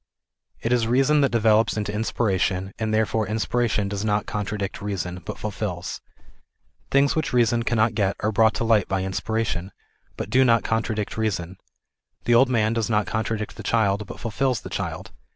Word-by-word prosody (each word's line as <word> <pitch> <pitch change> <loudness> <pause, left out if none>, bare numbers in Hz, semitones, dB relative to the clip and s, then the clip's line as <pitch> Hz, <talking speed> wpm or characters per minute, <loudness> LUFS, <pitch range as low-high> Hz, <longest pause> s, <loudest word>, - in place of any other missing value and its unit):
It 115 - +1
is 115 -2 +2
reason 135 +5 +3
that 140 - +3
develops 110 -1 +3
into 105 -1 -2
inspiration, 95 -3 0
and 110 -1 -1
therefore 110 0 +1
inspiration 110 -1 0
does 100 0 -3
not 105 -1 0
contradict 105 -1 -4
reason, 90 -3 -4
but - - -6
fulfils. 100 -4 -4 0.9
Things 140 +1 +3
which 155 -4 -1
reason 120 -1 +3
cannot 115 -1 +2
o - - +3
et 95 - -1
are 110 - +1
brought 110 0 +3
to - - -1
light 110 -4 +3
by 95 -1 -1
inspiration, 95 -1 -2 0.5
but - - -5
do 130 +1 +5
not 115 -2 +4
contradict 110 -2 -2
reason. 95 -5 -2 0.7
The 120 - +3
old 125 +3 +5
man 110 -3 +2
does 115 -1 -1
not 105 -2 +2
contradict 110 -1 -3
the - - -6
child 105 -3 +1
but - - -9
fulfils 125 +1 -1
the - - -9
child. - - -4
110 Hz, 175 wpm, -24 LUFS, 100-115 Hz, 0.9 s, do